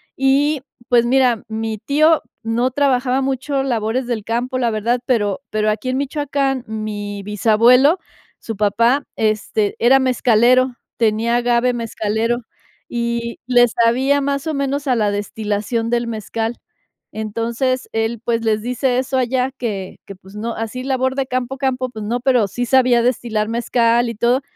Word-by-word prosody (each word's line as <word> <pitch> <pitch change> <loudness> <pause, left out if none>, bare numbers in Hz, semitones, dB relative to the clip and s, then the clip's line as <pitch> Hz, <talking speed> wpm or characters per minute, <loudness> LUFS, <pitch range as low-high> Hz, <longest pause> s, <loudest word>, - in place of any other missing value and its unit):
Y, 275 +2 +2 0.3
pues 240 -1 +4
mira, 250 -2 +2
mi 220 0 -3
tío 305 +7 +3 0.2
no 235 +3 0
trabajaba 265 -1 +1
mucho 270 +1 -1
labores 240 0 -1
del 235 -3 -3
campo, 245 +4 -2
la 240 - +1
verdad, 230 +3 0
pero 205 -4 0
pero, 215 0 0
aquí 220 +4 -3
en 255 - 0
Michoacán, 275 -2 -1
mi 205 -2 -5
bisabuelo, 230 - +4 0.4
su 225 - -6
papá, 230 +7 +2
este, 215 -1 0
era 255 +3 +5
mezcalero, 255 0 +3 0.2
tenía 230 +1 +1
agave 245 +1 +2
mezcalero, 230 0 -2 0.4
y 235 0 -3
le 245 -1 +5
sabía, 255 +5 +2
más 280 +2 -2
o 315 - -1
menos, 280 0 -2
a 255 - +3
la 210 -3 +1
destilación 210 +3 -2
del 235 0 0
mezcal. 225 +1 -4 0.5
Entonces, 230 +4 -2
él, 225 0 -1
pues, 230 -1 0
les 215 -1 +1
dice 250 +2 0
eso 260 0 -1
allá 255 +1 0
que 215 -8 -5
que, 195 - -9
pues, 190 +2 -16
no, 230 +2 -3
así 225 +3 -5
labor 260 0 0
de 270 -1 -1
campo, 255 +1 -3
campo, 255 -1 -1
pues, 220 -3 -7
no, 235 +3 -1
pero 250 -5 +3
sí 245 +6 -3
sabía 250 -1 +4
destilar 235 -3 0
mezcal 235 0 +2
y 230 - -5
todo. 240 +4 +2
240 Hz, 155 wpm, -19 LUFS, 220-260 Hz, 0.5 s, era